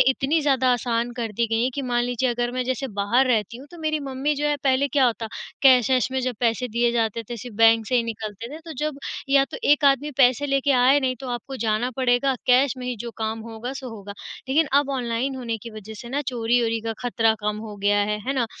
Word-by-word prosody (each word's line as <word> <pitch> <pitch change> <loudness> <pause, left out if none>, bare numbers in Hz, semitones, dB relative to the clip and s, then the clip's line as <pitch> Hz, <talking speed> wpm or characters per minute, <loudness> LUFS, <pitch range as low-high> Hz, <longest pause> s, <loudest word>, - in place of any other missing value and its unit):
इतनी 270 +4 +2
ज़्यादा 265 -3 +2
आसान 240 0 -1
कर 225 -2 -3
दी 235 +3 0
गई 225 +1 0
हैं 255 - +1
कि 280 - -3
मान 240 -2 0
लीजिए 245 +1 0
अगर 240 0 -1
मैं 255 0 -2
जैसे 260 +2 -2
बाहर 240 +7 +3
रहती 225 -3 0
हूँ 270 - -12
तो 345 - -12
मेरी 310 -1 -1
मम्मी 275 +2 -2
जो 295 +1 -1
है 295 - +1
पहले 270 +1 +2
क्या 275 -2 +5
होता 230 -1 -2 0.4
कैश 255 -3 +6
वैश 260 0 +2
में 265 - 0
जब 255 -1 -2
पैसे 240 +1 +1
दिए 235 +1 +1
जाते 230 -1 0
थे, 235 +2 -7
सिर्फ़ 235 +1 -9
बैंक 225 -1 +5
से 255 - -1
ही 240 - +3
निकलते 225 0 -6
थे, 310 - -7
तो 325 0 -9
जब 300 -1 -2 0.3
या 275 0 +5
तो - - -8
एक 295 0 +4
आदमी 280 +1 +3
पैसे 255 +1 +4
लेके 275 0 +1
आए 265 +3 +5
नहीं 255 -1 -1
तो 265 - -6
आपको 245 +2 -5
जाना 220 +3 0
पड़ेगा, 260 +1 +2
कैश 255 +1 +4
में 250 - -6
ही 250 - -2
जो 235 +2 -6
काम 220 0 -3
होगा 230 +3 -6
सो 265 -1 -7
होगा। 200 0 -9 0.4
लेकिन 310 +4 +3
अब 285 -1 -4
ऑनलाइन 245 +2 -2
होने 235 -3 -3
की 230 - -8
वज़ह 215 0 -9
से 240 - -9
ना 275 +4 -1
चोरी-वोरी 230 -2 +1
का 225 0 -3
खतरा 225 -2 +2
कम 210 0 -1
हो 210 - -8
गया 205 +1 +2
है, 210 +1 0
है 270 - +1
ना? 250 -3 +1
245 Hz, 250 wpm, -23 LUFS, 230-270 Hz, 0.4 s, कैश